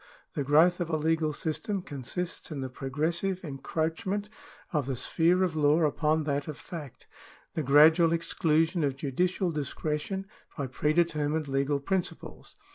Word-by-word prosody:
The 145 - -1
growth 160 +6 +4
of 175 -2 -2
a 160 - +1
legal 160 0 +1
system 175 +6 -3
consists 165 +6 -5
in 150 -4 -4
the 130 -1 -4
progressive 165 +9 -1
encroachment 165 +8 -2 0.4
of 145 -4 0
the 135 - -1
sphere 170 +8 +2
of 175 -4 0
law 150 +2 +4
upon 155 +1 +2
that 145 -1 -1
of 150 -2 -5
fact, 150 -7 -9 0.5
the 160 - -1
gradual 155 +4 +6
exclusion 165 0 +1
of 140 -2 0
judicial 175 +6 0
discretion 150 +5 -3 0.3
by 140 - -1
pre 130 +4 0
determined 155 -2 +1
legal 140 +1 0
principles. 185 +5 -4
155 Hz, 145 wpm, -29 LUFS, 145-170 Hz, 0.5 s, gradual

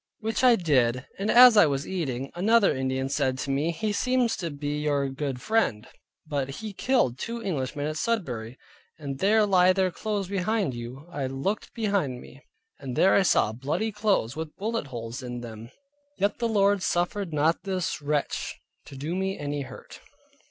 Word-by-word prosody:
Which 225 +2 -2
I 250 -2 +7
did, 130 - +1
and 200 +2 -1
as 245 -1 +9
I 205 -6 +7
was 140 0 -2
eating, 135 -8 -3
another 205 +2 +3
Indian 130 0 -1
said 135 -2 0
to 135 - -3
me, 145 +4 0
he 205 +6 -2
seems 250 +1 +1
to 170 -4 -3
be 145 0 -3
your 145 -2 +1
good 135 -1 -4
friend, 125 - 0 0.4
but 140 -3 -2
he 210 +9 -6
killed 195 - +1
two 235 0 -4
Englishmen 145 -4 -2
at 155 +1 -3
Sudbury, 130 - -2 0.4
and 140 -3 -6
there 210 +4 +4
lie 185 -2 +5
their 190 -1 +1
clothes 205 0 -3
behind 200 - 0
you: 120 +4 -8
I 140 -2 -2
looked 135 +11 -3
behind 200 - 0
me, 135 +2 -14 0.4
and 130 -3 -6
there 190 - +5
I - - +5
saw 175 - +3
bloody 145 - -2
clothes, 205 - 0
with 160 -1 -6
bullet 225 -4 -2
holes 120 +1 -6
in 120 -1 -6
them. 115 -1 -9 0.5
Yet 200 +1 0
the 235 - +1
Lord 200 -2 +3
suffered 175 +1 -1
not 155 +2 +1
this 185 -4 -2
wretch 145 0 -2 0.3
to 140 - -11
do 150 +5 -3
me 190 +1 -1
any 145 0 -3
hurt. 135 - -10
155 Hz, 180 wpm, -26 LUFS, 135-205 Hz, 0.5 s, as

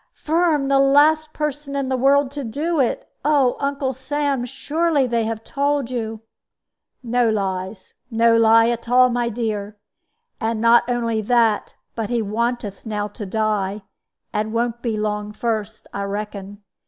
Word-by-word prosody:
"Firm 315 -3 +1
the 275 0 +3
last 300 +3 +4
person 295 -2 -4
in 275 -1 -1
the 260 - 0
world 275 +1 +3
to 285 0 -5
do 300 +8 -2
it! 255 - 0 0.2
Oh, 280 -4 +3
Uncle 280 -1 -1
Sam, 270 0 -1
surely 305 +2 0
they 235 -2 0
have 225 0 -4
told 280 -2 -1
you 225 -3 -4 0.4
" - - -62 0.2
"No 240 0 +2
lies 190 -2 -3 0.2
no 230 0 +3
lie 225 0 +5
at 235 0 -3
all, 250 0 +5
my 240 0 0
dear. 215 -3 -3 0.6
And 225 0 -1
not 235 +1 +4
only 230 -2 0
that, 225 -1 +1 0.2
but 225 -3 -4
he 240 -1 0
wanteth 225 -1 -2
now 210 -2 -3
to 210 -2 -8
die 210 -1 -1 0.5
and 215 +1 -2
won't 235 0 -1
be 225 -3 -2
long 210 0 -2
first, 220 -1 -3
I 200 - -3
reckon. 205 0 -6
235 Hz, 155 wpm, -21 LUFS, 215-275 Hz, 0.6 s, lie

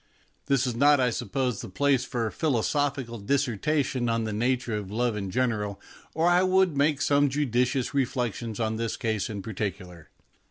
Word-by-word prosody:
This 135 -1 +2
is 125 - -1
not, 145 +3 +5
I 125 -2 +2
sup 105 - -5
pose, 130 -5 -1
the - - -8
place 135 +6 +1
for 120 -3 -2
a 110 - -2
philosophical 135 -3 -1
disserta 140 +4 +1
tion 125 -3 -2
on 115 0 0
the 110 -1 -3
nature 120 +1 0
of 105 -3 -4
love 115 +2 0
in 100 -2 -4
general, 105 -3 -1 0.4
or 160 +2 +2
I 175 +1 +5
would 185 -3 +3
make 145 +1 +2
some 145 0 +3
judicious 125 -2 0
reflections 120 -4 -2
on 110 -1 -1
this 115 -1 -2
case 110 -4 -1
in 100 -3 -5
particular. 95 -5 -5
125 Hz, 185 wpm, -27 LUFS, 110-140 Hz, 0.4 s, not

